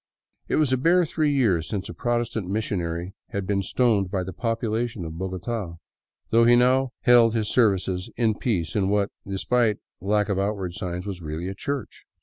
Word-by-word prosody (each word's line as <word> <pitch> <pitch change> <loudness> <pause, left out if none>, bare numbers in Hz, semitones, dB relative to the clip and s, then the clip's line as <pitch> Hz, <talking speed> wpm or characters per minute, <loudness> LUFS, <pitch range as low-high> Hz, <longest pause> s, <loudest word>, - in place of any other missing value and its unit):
It - - 0
was 150 -4 +2
a - - +3
bare 170 +6 +4
three 155 -1 0
years 95 - +2
since 100 -3 -3
a - - -7
Protestant 120 -4 -1
missionary 90 -4 -2 0.2
had 100 -1 -3
been 100 0 0
stoned 100 -1 +1
by 95 -1 -1
the 95 +1 -6
populace 115 +1 -1
of 80 -5 -6
Bogota, 95 0 -4 0.6
though 115 +1 +5
he 120 +1 +6
now 130 +2 +3
held 120 -2 +5
his 110 -2 0
services 95 -5 +2
in 115 -2 +2
peace 100 -8 -2
in 95 -2 +1
what, 100 0 +1 0.2
despite 105 +3 +1 0.2
the 95 - -9
lack 105 0 +2
of 100 -2 0
outward 100 -3 -2
signs, 90 -2 -4
was 95 -3 -5
really 80 +2 -4
a - - -4
church. 130 +2 -5
105 Hz, 185 wpm, -25 LUFS, 95-120 Hz, 0.6 s, he